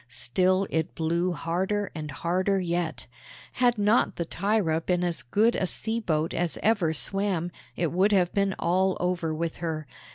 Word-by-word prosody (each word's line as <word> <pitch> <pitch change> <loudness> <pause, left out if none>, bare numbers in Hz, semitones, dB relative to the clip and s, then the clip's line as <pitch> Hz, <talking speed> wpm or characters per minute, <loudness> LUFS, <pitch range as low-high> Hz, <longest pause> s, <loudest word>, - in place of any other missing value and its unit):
Still 185 +10 +1
it 160 -1 -1
blew 170 +3 0
harder, 190 +5 -1
and 155 -2 -6
harder 185 +7 0
yet. 170 -2 -2 0.5
Had 245 -2 +2
not 210 +3 +3
the 170 - -2
Thyra 180 -3 0
been 180 +1 0
as 170 -6 -1
good 210 - +2
a 185 - 0
sea 225 +5 -1
boat 160 -6 -1
as 175 -1 -1
ever 205 -7 +3
swam, 180 +1 -1 0.2
it 170 -3 -1
would 190 +4 +3
have 180 -3 +2
been 200 -1 +1
all 185 +2 +1
over 175 -2 -1
with 165 +1 -3
her. 160 -2 -3
180 Hz, 165 wpm, -27 LUFS, 165-195 Hz, 0.5 s, not